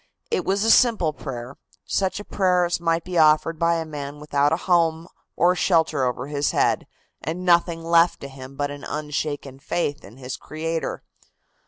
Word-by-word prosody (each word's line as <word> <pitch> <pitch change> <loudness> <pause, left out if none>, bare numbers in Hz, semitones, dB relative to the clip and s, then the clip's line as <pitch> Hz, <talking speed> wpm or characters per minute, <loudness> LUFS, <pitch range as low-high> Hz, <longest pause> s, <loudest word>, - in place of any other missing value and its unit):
It 460 - 0
was 200 +2 +1
a 225 - +4
simple 220 -12 +4
prayer, 130 -2 -7 0.3
such 190 0 -1
a - - -6
prayer 180 -2 +2
as 175 - -1
might 165 -1 0
be 180 -2 -1
offered 155 +1 +4
by 170 0 +3
a 165 -1 -2
man 145 -1 -7
without 145 -1 +1
a 160 - +2
home 165 -2 +2 0.3
or 175 - +4
a - - 0
shelter 160 -7 +2
over 125 +1 -2
his 145 0 -1
head - - +1 0.4
and 175 +3 -4
nothing 170 -1 +3
left 170 +1 +3
to 140 - -6
him 135 0 -11
but 145 0 -2
an 145 0 -9
unshaken 145 -2 -4
faith 145 0 -2
in 105 +6 -14
his 130 0 -6
Creator. 165 +1 -4
160 Hz, 185 wpm, -23 LUFS, 145-170 Hz, 0.4 s, a